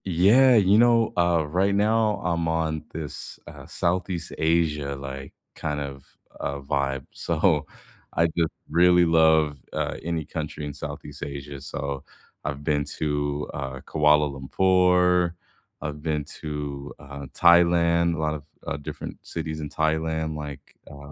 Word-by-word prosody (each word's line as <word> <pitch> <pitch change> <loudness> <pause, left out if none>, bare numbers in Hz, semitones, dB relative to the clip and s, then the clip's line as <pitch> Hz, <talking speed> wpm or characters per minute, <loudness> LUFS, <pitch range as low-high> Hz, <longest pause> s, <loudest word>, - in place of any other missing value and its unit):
Yeah. 105 +9 +5
You 100 0 +5
know, 115 -1 +4
uh, 85 -2 +3
right 95 +6 +1
now, 110 +1 +2
I'm 85 -1 0
on 80 -1 -1
this, 75 -3 -7
uh, - - -10
Southeast 90 -1 -2
Asia, 80 -3 +1
like, 70 0 -7 0.2
kind 75 -1 -3
of, 70 -1 -8 0.2
uh, 70 0 -3
vibe. 70 -1 -1
So, 80 -2 +1 0.5
I 85 - +3
just 80 -1 0 0.2
really 90 +2 +5
love, 80 -3 +4 0.2
uh, - - -2
any 80 -1 -2
country 75 0 -5
in 75 - -5
Southeast 70 +1 -7
Asia. 70 -1 -7
So, 70 0 -4 0.4
I've 70 +1 -4
been 75 -1 +1
to, 75 -1 -1
uh, 65 -2 -5
Kuala 75 -1 +3
Lumpur. 90 +4 +3 0.5
I've 75 -1 -5
been 75 -2 -1 0.2
to, 75 -2 -5
uh, 70 0 -9
Thailand, 85 -1 +5
a - - -5
lot 75 -1 0
of, 75 -2 -6 0.2
uh, - - -3
different 70 - -7
cities 80 -1 -4
in 75 -1 -5
Thailand 80 0 -1
like, 75 -2 -8
uh, 70 0 -11
80 Hz, 140 wpm, -25 LUFS, 70-85 Hz, 0.5 s, Yeah